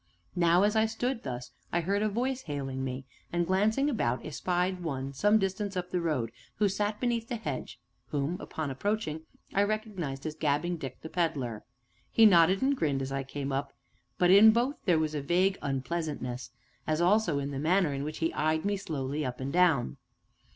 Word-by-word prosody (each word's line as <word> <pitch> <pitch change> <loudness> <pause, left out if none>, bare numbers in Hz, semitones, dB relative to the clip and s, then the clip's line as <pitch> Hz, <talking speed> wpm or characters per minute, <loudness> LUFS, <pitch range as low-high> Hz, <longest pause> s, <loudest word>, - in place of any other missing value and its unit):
Now, 175 +1 +4
as 210 +1 +2
I 220 0 +4
stood 230 +2 -2
thus, 125 -1 -6 0.2
I 170 - +1
heard 200 +4 0
a 215 - +2
voice 255 +5 -1
hailing 135 - -4
me, 130 0 -4 0.3
and, 175 0 +1
glancing 210 +9 +2
about, 125 - 0
espied 180 +4 -1
one, 135 -4 -3
some 205 +10 +4
distance 195 0 -2
up 180 0 -4
the 180 - 0
road, 140 -9 -1 0.2
who 210 - +2
sat 205 +2 -1
beneath 235 -2 0
the 240 - -1
hedge, 225 - -5 0.3
whom, 145 +3 -1
upon 155 -3 -4
approaching, 160 0 -2 0.3
I 200 - +3
recognized 200 -10 -2
as 155 - -2
Gabbing 155 +3 0
Dick, 135 -4 -8
the 160 - -6
Pedler. 140 -11 -1 0.5
He 225 - +6
nodded 185 +1 +6
and 280 +1 +3
grinned 140 - 0
as 135 - -5
I 135 0 -1
came 135 +1 -5
up, 135 +1 -2 0.4
but 180 0 +4
in 205 +3 +9
both 240 +6 +1
there 175 -4 +4
was 155 -1 0
a 150 - -2
vague 180 +6 +2
unpleasantness, 135 -3 -3 0.4
as 155 0 +1
also 180 -3 +3
in 140 0 -2
the 135 - -3
manner 165 0 +2
in 140 0 -3
which 155 +1 -4
he 165 0 -1
eyed 155 +3 0
me 205 0 +1
slowly 150 -6 -3
up 125 -2 -4
and 135 +1 -4
down. 160 - +3
170 Hz, 195 wpm, -29 LUFS, 140-205 Hz, 0.5 s, in